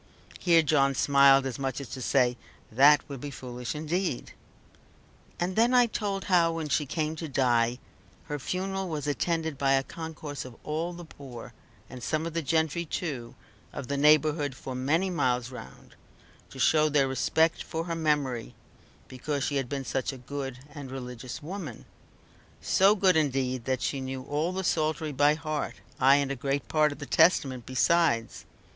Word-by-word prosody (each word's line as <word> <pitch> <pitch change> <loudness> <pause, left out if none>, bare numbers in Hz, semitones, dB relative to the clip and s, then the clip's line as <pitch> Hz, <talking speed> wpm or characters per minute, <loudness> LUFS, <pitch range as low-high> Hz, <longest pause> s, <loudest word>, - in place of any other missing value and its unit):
Here 170 -3 +4
John 140 -3 +2
smiled, 140 0 +5
as 130 -2 -4
much 135 -1 -2
as 140 - -7
to 130 - -7
say, 125 -1 +2 0.4
"that 140 +6 +5
would 140 -3 -7
be 145 - -5
foolish 125 -2 -6
indeed." 160 0 -2 1.1
And 180 +1 -1
then 235 +3 +4
I 245 -1 +6
told 200 -4 -3
how, 170 -3 +3
when 160 -2 -4
she 145 0 +1
came 155 +2 -2
to 165 - -5
die, 120 -3 +2 0.5
her 150 -1 -5
funeral 190 +4 -3
was 150 -3 -3
attended 160 0 -1
by 135 -1 +3
a 135 0 +3
concourse 160 -2 -7
of 125 -2 -11
all 160 +3 -2
the 175 0 -9
poor, 130 -6 -11 0.3
and 125 - -10
some 155 +4 -1
of 165 - -4
the 165 - -1
gentry 160 +2 0
too, 145 -7 -5 0.4
of 125 - -7
the 140 - 0
neighbourhood 150 -1 +3
for 130 - -7
many 155 +9 0
miles 125 -6 0
round, 65 - -11 0.6
to - - -12
show 155 +4 +4
their 140 -2 +3
respect 160 +5 +1
for 165 0 -4
her 170 0 -4
memory, 145 -7 -1 0.5
because 140 +2 -3
she 145 - 0
had 135 -3 -2
been 140 -2 -3
such 130 +2 -2
a 135 - -9
good 135 0 -6 0.2
and 145 -3 -8
religious 125 0 -7
woman; 165 - -7 0.7
so 195 +2 +4
good 190 -3 +3
indeed 130 -5 0
that 130 -1 -1
she 135 - -1
knew 130 0 -5
all 150 +5 -1
the 190 +1 -3
Psaltery 155 -2 0
by 145 +2 +3
heart, 155 -1 -3 0.2
ay, 135 +1 +6
and 140 -1 +1
a - - -2
great 140 +1 -2
part 155 -1 +3
of 145 - -7
the 145 - -7
Testament 140 -7 +3
besides. 130 -3 +1
145 Hz, 175 wpm, -28 LUFS, 130-160 Hz, 1.1 s, I